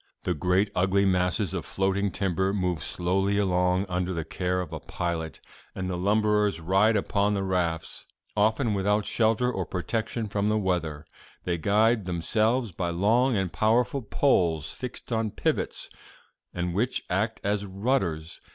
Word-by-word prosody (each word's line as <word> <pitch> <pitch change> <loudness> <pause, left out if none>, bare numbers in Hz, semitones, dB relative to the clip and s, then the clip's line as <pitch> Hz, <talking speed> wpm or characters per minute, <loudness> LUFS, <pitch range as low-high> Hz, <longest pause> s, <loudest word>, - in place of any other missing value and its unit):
"'The 90 - 0
great 90 +6 +1
ugly 95 +2 +2
masses 90 0 +1
of - - -2
floating 95 +1 0
timber 95 +1 0
move 90 -5 -1
slowly 95 +6 0
along 90 -1 +2
under 90 0 -1
the 80 -1 -3
care 90 +2 -1
of 90 -4 -5
a - - -4
pilot, 85 -2 -4 0.4
and 95 -1 -3
the - - -2
lumberers 105 0 +2
ride 100 +6 +3
upon 100 +1 +1
the 100 - -1
rafts, 85 -3 -2 0.3
often 110 +2 +2
without 105 +1 +1
shelter 115 +2 +2
or 95 - -2
protection 110 +6 -3
from 105 0 0
the 110 - +2
weather. 85 -7 -1 0.4
They 85 -2 -1
guide 105 +3 +2
themselves 110 +7 +1
by 85 0 -2
long 110 +8 +2
and 95 -3 -1
powerful 120 +5 +2
poles 85 - +1
fixed 125 0 -8
on 110 -1 0
pivots, - - -1 0.6
and 90 0 -3
which 120 +7 0
act 105 +5 -1
as 100 0 -1
rudders. 95 -6 -1
95 Hz, 150 wpm, -27 LUFS, 90-105 Hz, 0.6 s, ride